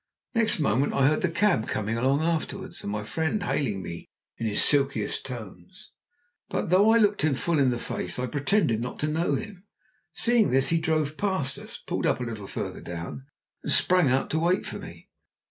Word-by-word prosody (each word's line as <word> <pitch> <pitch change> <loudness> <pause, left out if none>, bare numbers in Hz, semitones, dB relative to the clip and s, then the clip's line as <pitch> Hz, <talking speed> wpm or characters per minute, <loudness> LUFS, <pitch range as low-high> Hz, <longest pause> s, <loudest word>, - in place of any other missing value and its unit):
Next 225 -6 +3
moment 140 -2 +1
I 135 - +3
heard 150 +2 +3
the 185 - +1
cab 170 - +1
coming 110 +1 -2
along 135 +5 +1
after 165 -1 -1
us, - - -8
and 100 - -4
my 105 0 -3
friend 160 - -2
hailing 130 -9 -1
me 85 -1 -8 0.3
in 115 - -1
his 105 - +2
silkiest 140 -7 +2
tones; 125 - -10 0.6
but - - -2
though 200 +4 +5
I 225 - +6
looked 210 -2 +3
him 155 -3 +2
full 165 +3 0
in 135 -2 +4
the 120 - -1
face - - -4
I 125 - -1
pretended 135 - +1
not 125 +1 -5
to 150 - +1
know 160 +3 0
him. 210 -3 -7 0.4
Seeing 235 -3 +2
this 135 +1 +3
he 165 - +2
drove 155 -2 -1
past 190 -10 -1
us - - -9
pulled - - -1
up - - +1
a - - -3
little 110 -4 -6
farther - - -5
down 85 +10 -7 0.3
and - - -3
sprang 180 -6 +4
out 130 +1 0
to 160 - +1
wait 175 +3 +1
for - - -6
me. - - -11
145 Hz, 205 wpm, -26 LUFS, 120-180 Hz, 0.6 s, I